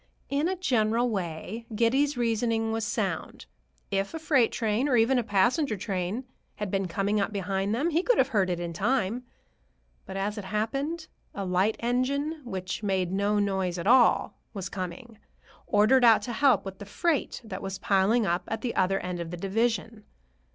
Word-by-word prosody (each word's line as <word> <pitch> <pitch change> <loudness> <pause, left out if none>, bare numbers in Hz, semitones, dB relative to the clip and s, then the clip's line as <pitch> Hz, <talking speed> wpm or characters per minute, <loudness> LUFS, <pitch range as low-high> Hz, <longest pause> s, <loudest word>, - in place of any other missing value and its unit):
In 285 +4 +1
a 375 - 0
general 240 -8 +1
way, 190 +4 -4
Giddy's 265 +5 +2
reasoning 225 -1 0
was 225 0 -1
sound. 225 - -3 0.5
If 195 +8 -1
a - - -2
freight 295 -7 +2
train, 225 +4 0
or 255 - +3
even 240 +3 +4
a - - -1
passenger 225 - +2
train, 190 +4 -3 0.3
had 210 -3 -4
been 195 -1 0
coming 200 +4 0
up 200 - -1
behind 195 +1 -1
them, 305 +8 0
he 330 +2 +2
could - - +2
have 265 - +3
heard 200 -7 +1
it 175 -1 -1
in 170 -1 -4
time. 230 +4 0 0.8
But 195 - -5
as 205 +2 -2
it 200 - -7
happened, 275 - -2 0.3
a 200 - -3
light 185 +4 +2
engine, 280 +6 0
which 185 -4 -4
made 190 -4 0
no 200 +2 +1
noise 190 -3 0
at 170 - -4
all, 245 +2 +4 0.2
was 190 -2 -4
coming,—ordered 210 +4 -1
out 225 -3 +6
to 240 - -4
help 270 -2 +3
with 190 -1 -7
the 205 - -8
freight 330 +7 -1
that 195 -4 -7
was 195 -1 -4
piling 200 +4 +2
up 175 0 0
at 225 - -3
the 245 -3 -3
other 190 +1 +2
end 180 -1 -4
of 170 -1 -4
the 175 - -6
division. 220 +3 -1
215 Hz, 180 wpm, -27 LUFS, 195-245 Hz, 0.8 s, out